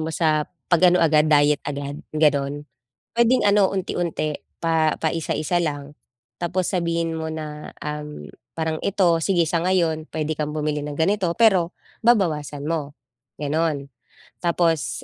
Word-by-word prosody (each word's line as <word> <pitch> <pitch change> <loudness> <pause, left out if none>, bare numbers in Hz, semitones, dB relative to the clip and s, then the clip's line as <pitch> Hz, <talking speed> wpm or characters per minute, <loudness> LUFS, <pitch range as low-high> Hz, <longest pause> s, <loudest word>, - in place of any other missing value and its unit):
mo 160 - -2
sa 155 -2 +1 0.2
pag 175 0 +3
ano 180 0 +4
agad 155 -1 +4
diet 145 -1 +4
agad 145 0 -4 0.2
gano'n. 145 -1 +1 0.5
Puwedeng 235 +2 +3
ano 205 -1 +5
unti-unti, 170 -5 -2 0.3
pa 160 -2 +2
paisa-isa 165 +1 -1
lang, 145 -3 -3 0.5
tapos 175 +1 -1
sabihin 170 -2 0
mo 160 - -3
na, 155 -1 -6
um, 150 0 -5 0.3
parang 160 -1 -2
ito 180 -4 +2
sige 175 0 +2
sa 165 +1 0
ngayon 165 -3 0
puwede 155 0 -2
kang 150 0 -2
bumili 150 -1 -1
ng 145 -1 -5
ganito 190 +4 +1
pero, 195 -7 +3 0.3
babawasan 155 - +2
mo, 150 -2 -3 0.4
gano'n. 150 -1 -1 0.6
Tapos, 165 -6 +1
160 Hz, 135 wpm, -23 LUFS, 150-175 Hz, 0.6 s, ano